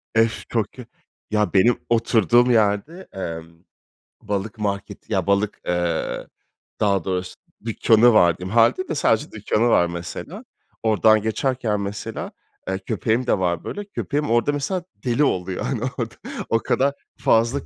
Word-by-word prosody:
Ef 115 -1 +1
çok 110 -4 -1
kö 125 -2 -11 0.5
ya, 105 -4 +1
benim 115 +5 +4
oturduğum 120 +1 +3
yerde 110 - +1
emm, 85 -3 -6 0.6
balık 105 +2 -3
marketi 100 -2 -4
ya, - - 0
balık, 100 +1 +1
eee, 85 -1 -1 0.5
daha 100 -4 +2
doğrusu 90 -1 -3 0.3
dükkânı 115 +1 +4
var 85 -5 +5
diyeyim. 95 +4 -6
Hâlde 120 +10 +4
de 160 - -3
sadece 110 -5 +1
dükkânı 110 +2 0
var 85 - +4
mesela. 85 0 -7 0.4
Oradan 110 0 +4
geçerken 110 -1 -1
mesela, 100 +1 -5 0.4
eee, 95 0 -1
köpeğim 115 +5 -1
de 105 - +2
var 90 -2 0
böyle, 205 0 -5
köpeğim 150 - -2
orada, 120 +5 +3
mesela, 170 +5 -2 0.2
deli 125 +4 +2
oluyor 95 -8 -1
hani 125 -5 -2 0.2
orada. 115 -3 -3 0.3
O 115 - +3
kadar 135 +4 +1 0.2
fazla 115 +5 +2
110 Hz, 145 wpm, -22 LUFS, 95-120 Hz, 0.6 s, var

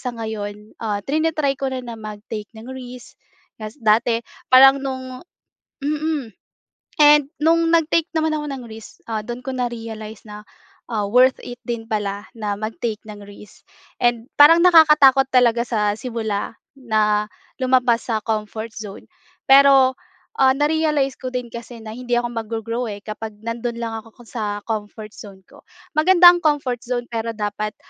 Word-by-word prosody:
sa 245 -2 -5
ngayon, 210 -1 -6
ah, 205 -3 -3
trina-try 310 -1 0
ko 270 - -1
na 255 -1 -5 0.2
mag-take 210 0 -7
ng 220 - -11
risk. 250 -1 -11 0.4
Ta’s 215 +3 -8
dati 230 0 +1 0.2
parang 270 +1 +7
nung 260 -1 -6 0.6
mm, 295 -5 -3 0.6
and 295 -2 +6
nung 325 +2 +3
nag-take 330 0 +2
naman 315 0 +1
ako 300 -1 -3
ng 270 -3 -6
risk, 220 -1 -13
ah, 220 -2 -3
dun 240 +3 -7
ko 265 - -4
na-realize 225 -4 -6
na, 210 0 -10 0.5
ah, 215 -3 -2
worth 250 +5 +4
it 245 0 -9
din 230 -1 -3
pala 205 -2 -3
na 210 -3 -4
mag-take 215 +1 -4
ng 210 -1 -10
risk. 205 0 -15 0.4
And 240 -1 +1
parang 330 +4 +8
nakakatakot 300 -6 +6
talaga 240 -3 +3
sa 210 -3 +1
simula 225 -4 -4 0.2
na 215 -4 0 0.3
lumabas 255 -2 +2
sa 220 -2 -1
comfort 220 0 -4
zone. 210 -2 -9 0.4
Pero, 270 -1 +6 0.5
ah, 265 0 +5
na-realize 295 -2 +1
ko 255 - -4
din 250 -2 -5
kasi 235 0 -9
na 215 - -7
hindi 245 +1 -2
ako 240 0 0
mag-go-grow, 230 +1 -4
eh, 205 0 -9
kapag 215 0 -7
nandun 230 +1 -4
lang 230 -1 -4
ako 225 +2 -18
sa 210 -3 -5
comfort 215 -1 -5
zone 195 -3 -13
ko. - - -18 0.3
Maganda 350 +3 +7
ang 350 - -2
comfort 280 -6 0
zone 245 -1 -3
pero 230 0 -2
dapat, 210 0 -4
235 Hz, 155 wpm, -21 LUFS, 215-270 Hz, 0.6 s, parang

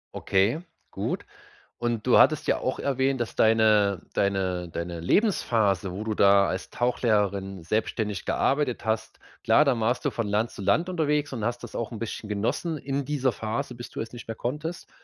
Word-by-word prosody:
Okay, 100 +11 +1 0.3
gut - - -3 0.5
und 120 -2 -2
du 125 - +6
hattest 155 -2 +4
ja - - +3
auch 130 - -2
erwähnt, 135 -1 0
dass 120 - -3
deine 110 -4 +4
deine 95 -3 0
deine 85 +1 -5
Lebensphase, 105 - +1
wo 95 +4 -5
du 110 0 -2
da 100 -1 +5
als 95 - -4
Tauchlehrerin 100 -6 0
selbstständig 105 +1 -2
gearbeitet 135 -4 0
hast 110 0 -2 0.2
klar, 150 - +5
dann 135 -5 +2
warst 120 +3 0
du - - +2
von 115 - -2
Land 105 +3 0
zu - - -10
Land 165 - +2
unterwegs 150 -5 0
und 115 -5 -3
hast 120 +1 -2
das - - -8
auch 115 0 -3
'n 115 - -7
bisschen 115 -1 -5
genossen 110 +11 -1
in 140 0 -3
dieser 135 -2 +1
Phase, 115 +5 -3
bis 120 - -8
du - - -6
es 115 - -5
nicht 120 - -9
mehr 115 - -4
konntest. 150 +9 -5
115 Hz, 185 wpm, -26 LUFS, 100-130 Hz, 0.5 s, du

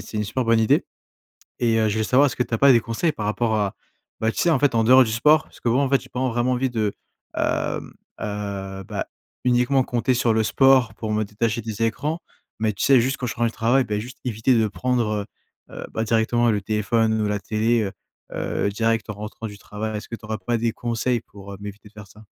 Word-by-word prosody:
c'est 110 - -8
une 105 - 0
super 125 +5 -2
bonne 115 0 +4
idée 110 -1 +3 0.8
et 115 -2 +2
heu, 110 -1 +2
je 105 - 0
voulais 110 0 0
savoir, 130 +6 +4
est-ce 135 - -2
que 125 - +2
tu - - -11
as - - 0
pas 140 +2 +7
des 115 - +5
conseils 115 +9 -1
par 105 -6 -4
rapport 110 +1 0
à 100 -2 -1 0.4
bah 110 0 0
tu - - -8
sais 175 - +3
en 160 - +3
fait 140 -4 +2
en 115 - +3
dehors 130 +3 +7
du 110 - -3
sport, 150 +7 +4
parce - - -19
que 120 - -1
bon, 125 +4 +3
en 140 - +2
fait 135 0 +3
j'ai - - -14
pas 125 - -7
en 130 - +1
vraiment 120 +2 0
envie 130 +1 0
de, 110 -4 -1 0.4
hem, - - -1 0.3
heu, 100 -2 -4
bah, - - -4 0.4
uniquement 125 +2 +3
compter 125 +1 0
sur 120 -1 +2
le 110 - +3
sport 130 -1 +4
pour 110 0 -4
me 110 - +1
détacher 110 +3 -1
des 110 0 -5
écrans. 150 +8 -1 0.4
Mais 110 -2 +1
tu - - -5
sais, 135 -3 +6
juste 130 +3 0
quand 125 - -4
je 115 - -3
rentre 120 0 +1
du 115 - -2
travail, 125 +5 +2
bah 105 -2 -2
juste 120 +4 -8
éviter 120 +2 +2
de 110 -1 +2
prendre, 110 -3 -1 0.4
heu - - -11
heu, - - -6
bah 110 - 0
directement 115 +1 +2
le 105 -2 +1
téléphone 110 +2 +1
ou - - 0
la 105 0 0
télé, 110 +3 +1
heu 95 - -4 0.4
heu, - - -1
direct 115 +1 0
en - - -4
rentrant 105 +2 -7
du 105 -2 -8
travail. 110 +2 -5
Est-ce 105 - -7
que 115 - -4
tu 110 - -19
aurais 110 0 -2
pas 120 -1 +2
des 115 0 0
conseils 120 +1 -1
pour, 100 -2 -12
heu, - - -8
m'éviter 105 +1 -9
de 105 - -26
faire 105 -1 -11
ça? 105 +3 -17
115 Hz, 260 wpm, -23 LUFS, 105-125 Hz, 0.8 s, pas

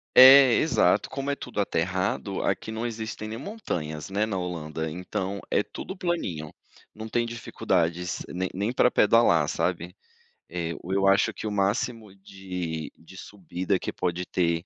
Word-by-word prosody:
É, 130 0 +10
exato. 145 -9 +3
Como 135 +1 -4
é 140 - +1
tudo - - -3
aterrado, - - -1
aqui - - -1
não 110 +2 -3
existem 110 -2 -5
nem 110 +1 -5
montanhas, 85 - -5
né, 100 +2 +1
na 105 -3 -3
Holanda, 80 -3 -4
então, 95 +4 -4
é - - +3
tudo 190 - -7
planinho. 165 - -3 0.4
Não 110 +1 -7
tem 120 +1 0
dificuldades 90 -7 -1
nem 90 +1 -3
nem 100 +6 -1
pra 125 - +4
pedalar, 105 -11 +4
sabe. 90 +2 -2 0.5
Eh, 85 -1 -3
o 90 - -6
eu 100 0 +2
acho 100 +1 +4
que - - -7
o 105 - -2
máximo 105 +1 -1
de 90 -5 -6
de 85 +3 -16
subida 95 -1 -3
que - - -4
pode 90 0 -2
ter, 85 -1 0
95 Hz, 160 wpm, -26 LUFS, 85-115 Hz, 0.5 s, É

